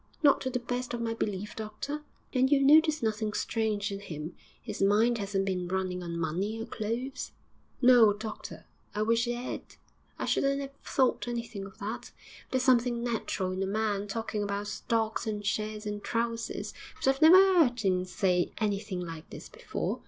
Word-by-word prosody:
'Not 285 -2 +6
to 260 - -1
the 250 - -1
best 245 0 -3
of 235 - -4
my 225 -1 -1
belief, 210 -2 -3
doctor.' 220 +8 -5 0.3
'And 260 +1 +3
you've 275 -1 +5
noticed 310 0 +6
nothing 215 -1 0
strange 215 -3 -1
in 195 - -4
him? 160 -4 -6 0.3
His 210 -4 -6
mind 220 +4 +4
hasn't 195 -1 -1
been 180 -2 -1
running 185 0 -2
on 170 -1 -4
money 185 +7 -1
or 225 - -3
clothes?' 235 +4 -4 0.5
'No, 245 -4 +8
doctor; 215 +1 -7 0.3
I 210 - +1
wish 230 +2 +2
it 240 - 0
'ad. 245 +1 -4 0.6
I - - -2
shouldn't 275 0 +2
'ave 275 -1 -5
thought 260 -2 +1
anything 230 -4 -4
of 195 - -15
that; 210 +3 -5 0.4
there's 260 -1 0
something 240 -2 +3
natural 220 -5 -1
in 185 +1 -3
a 195 - 0
man 205 0 0
talking 215 0 -3
about 200 0 -2
stocks 225 +1 -1
and 210 -1 -3
shares 215 +1 -2
and 205 0 -4
trousers, 230 0 -2 0.2
but - - -3
I've 270 +2 +3
never 325 +4 +10
'eard 330 - +5
'im 185 -1 +2
say 180 -1 +1
anything 205 -3 -1
like 165 -2 -7
this - - -9
before. 475 0 -3
220 Hz, 180 wpm, -30 LUFS, 200-245 Hz, 0.6 s, never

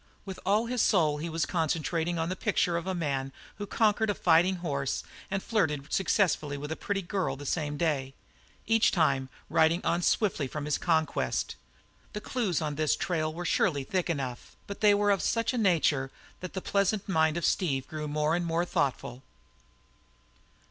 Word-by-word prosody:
With 190 -2 -7
all 210 +4 +3
his 245 0 -1
soul 155 -7 +3
he 165 +3 -4
was 165 0 -1
concentrating 165 0 -1
on 165 0 -1
the 185 - -2
picture 175 -2 +1
of 170 - -2
the 190 0 -2
man 135 -5 -2 0.3
who 205 - -4
conquered 220 0 +2
a 205 - +1
fighting 175 +2 +4
horse 140 -6 -2 0.3
and 195 0 -2
flirted 155 -11 -1
successfully 175 -7 +1
with 150 +2 -6
a - - -1
pretty 195 +2 -3
girl 190 +1 -2
the 145 - -9
same 145 0 -2
day; 140 -4 -1 0.5
each 225 0 +4
time 140 -7 +1 0.2
riding 160 +2 +3
on 175 - +1
swiftly 175 -7 +1
from 145 +2 -5
his 150 - 0
conquest. 160 -3 0 0.6
The 210 - -3
clues 205 - -1
on 150 -1 -3
this 155 -2 +2
trail 165 -4 -1
were 175 +2 -6
surely 150 -6 +1
thick 180 +5 -2
enough, 135 -6 -4
but 200 - -8
they 210 -1 +6
were 205 0 +2
of 200 - +2
such 230 +2 0
a - - -2
nature 160 -9 +2 0.3
that 185 - -7
the 190 - -4
pleasant 200 +1 0
mind 160 -3 +2
of 170 - -1
Steve 135 -9 0
grew 155 -1 -5
more 150 +2 +1
and 175 - -1
more 170 +1 0
thoughtful. 130 -5 -2
170 Hz, 185 wpm, -29 LUFS, 150-195 Hz, 0.6 s, they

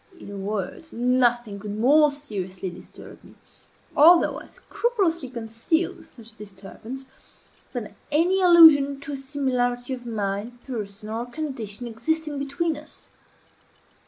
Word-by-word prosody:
In 200 - -10
a - - -7
word, 200 - -4
nothing 240 -3 +1
could 205 0 -6
more 295 +7 +5
seriously 195 -10 -5
disturb - - -13
me - - -17 0.6
(although 335 +4 +6
I - - -13
scrupulously 370 - -1
concealed 255 +10 -2
such 230 -2 -10
disturbance) 210 +5 -10 0.7
than - - -6 0.2
any 350 +6 +3
allusion 315 -6 +7
to 290 - -7
a - - -3
similarity 260 -3 -1
of 245 -2 -7
mind, 215 +2 -4
person, 215 -4 -6
or 230 +2 -3
condition 245 -6 -5
existing 290 +6 -2
between 285 +3 -1
us. 300 +1 -8
250 Hz, 125 wpm, -24 LUFS, 220-300 Hz, 0.7 s, allusion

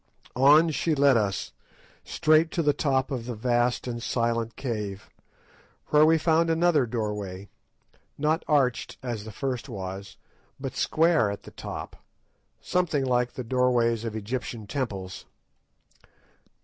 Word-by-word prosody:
On 150 +5 +6
she 155 +1 0
led 140 -2 +5
us, 100 -5 -1 0.5
straight 155 +1 +3
to 170 - 0
the 145 -1 +3
top 135 -2 0
of 125 -3 -4
the 120 - -4
vast 120 +2 0
and 120 -1 -4
silent 115 -1 -1
cave, 105 -6 -5 0.8
where 150 +1 +6
we 165 0 +5
found 165 +1 +2
another 165 -5 +3
doorway, 105 -4 -4 0.7
not 155 +2 +1
arched 135 -6 +1
as 115 -5 -4
the 110 - -7
first 130 +2 -4
was, 95 -2 -7 0.4
but 135 -1 -5
square 160 -9 +2
at 100 - -6
the - - -12
top, - - -7 0.6
something 165 -6 0
like 125 -1 +1
the 130 - -5
doorways 120 -2 +1
of 115 -2 -4
Egyptian 110 +1 -4
temples. 100 -6 -4
125 Hz, 135 wpm, -26 LUFS, 110-150 Hz, 0.8 s, On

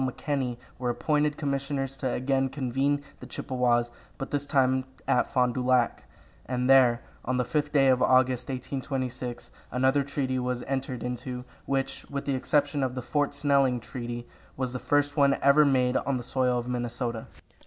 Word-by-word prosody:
McKenney 130 -1 -2 0.2
were 125 -1 -1
appointed 150 +4 +1
commissioners 135 -1 -2
to 130 0 -1
again 135 +1 0
convene 135 +2 0 0.2
the - - -10
Chippewas, 120 -2 0 0.3
but 135 - -6
this 145 0 -1
time 130 -1 +2 0.2
at - - +2
Fond 125 -1 +2
du 130 - -2
Lac, 125 -1 +2 0.4
and 125 0 -1
there, 130 -3 +6 0.2
on 130 +1 -1
the 125 - +1
fifth 145 +4 -1
day 140 -3 +4
of 130 -1 +4
August, 130 -1 +3
1826, 130 -2 -4 0.2
another 130 +3 +3
treaty 135 -2 -2
was 125 -1 -2
entered 130 -2 -3
into, 125 0 -4 0.2
which, 135 -1 -1
with 140 -1 -4
the 140 - 0
exception 145 +2 +1
of 130 -1 -1
the 125 - -4
Fort 145 +3 0
Snelling 140 -3 +3
treaty, 120 0 -6 0.3
was 130 -1 -2
the 125 - -3
first 145 +1 +1
one 140 -1 +4
ever 140 +2 +6
made 130 -2 +2
on 135 0 0
the 120 - -5
soil 125 0 +1
of 120 0 -3
Minnesota. 120 -1 -3
130 Hz, 170 wpm, -27 LUFS, 125-140 Hz, 0.4 s, there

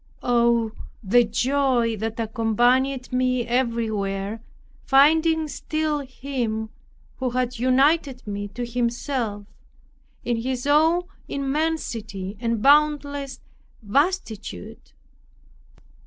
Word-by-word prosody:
Oh, 235 -2 +2 0.3
the 240 +5 +5
joy 245 0 +1
that 225 +2 -4
accompanied 245 +4 +1
me 255 -1 +1
everywhere, 220 -4 -1 0.4
finding 315 +3 +4
still 310 0 -2
Him 250 -5 -4 0.5
who 260 -1 -1
had 250 -1 -2
united 265 +1 +2
me 205 -1 -4
to 240 +4 -5
Himself, 235 -2 -2 0.8
in 240 -1 0
His 250 +2 -3
own 320 +4 +4 0.2
immensity 270 -9 -3
and 230 -2 -1
boundless 285 -1 +2 0.4
vastitude! 220 - -2
245 Hz, 85 wpm, -23 LUFS, 225-280 Hz, 0.8 s, the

